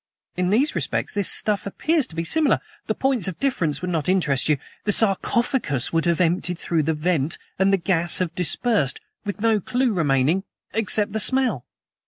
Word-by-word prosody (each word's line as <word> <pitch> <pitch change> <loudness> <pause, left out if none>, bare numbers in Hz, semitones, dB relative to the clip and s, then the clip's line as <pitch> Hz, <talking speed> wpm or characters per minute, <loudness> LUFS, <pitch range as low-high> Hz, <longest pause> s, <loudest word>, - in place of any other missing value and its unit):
In 180 0 0
these 255 - +2
respects - - -2
this 200 -2 +1
stuff 210 -2 -1
appears 305 - 0
to 160 - -13
be 165 - -1
similar; 305 - +3 0.3
the - - 0
points 265 -8 +1
of 185 - -5
difference 175 - -1
would 180 - -2
not 165 0 -1
interest 155 -8 +1
you. 150 - +3 0.3
The 210 - +2
sarcophagus 205 - +1
would 165 0 +1
have 170 0 +1
emptied 180 0 +1
through 165 -2 0
the 160 +1 0
vent, 155 -2 0 0.2
and 190 +1 +4
the 195 - +4
gas 170 -2 +2
have 180 -3 -1
dispersed, 220 - 0 0.3
with 205 0 -4
no 225 -1 +3
clew 250 +4 0
remaining 155 +1 +2 0.3
except 215 -1 +1
the 220 - -1
smell." 245 - +1
185 Hz, 185 wpm, -23 LUFS, 165-225 Hz, 0.3 s, and